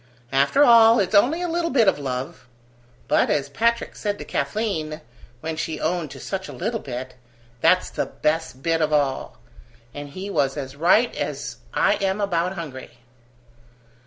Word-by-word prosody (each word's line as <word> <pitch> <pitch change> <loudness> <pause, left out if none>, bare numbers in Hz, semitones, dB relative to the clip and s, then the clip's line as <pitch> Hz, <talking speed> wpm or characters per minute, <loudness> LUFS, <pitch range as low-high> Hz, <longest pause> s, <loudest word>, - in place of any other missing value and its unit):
After 140 - +4
all, 230 -3 +7
it's 195 0 0
only 275 +12 +4
a - - -1
little 335 0 -1
bit 240 -5 +3
of 170 - +3
love. 130 -2 -5 0.6
But, - - +3
as 140 -1 0
Patrick 230 +10 0
said 205 -1 -3
to - - -8
Kathleen, 175 -9 -2 0.4
when 160 0 -3
she 155 0 -3
owned 165 -1 -1
to - - -10
such 190 -1 -4
a - - -8
little 220 +6 -2
bit, 130 -3 -6 0.5
'that's - - +3
the - - -2
best 155 -4 -2
bit 165 0 +1
of 155 0 +1
all!' 145 -3 0 0.6
and 145 0 -7
he 185 +7 -7
was 140 -4 0
as 135 -1 -6
right 185 +10 +3
as - - -4
I - - +2
am 195 0 -1
about 180 -2 0
hungry." 150 -8 -8
170 Hz, 165 wpm, -23 LUFS, 145-215 Hz, 0.6 s, all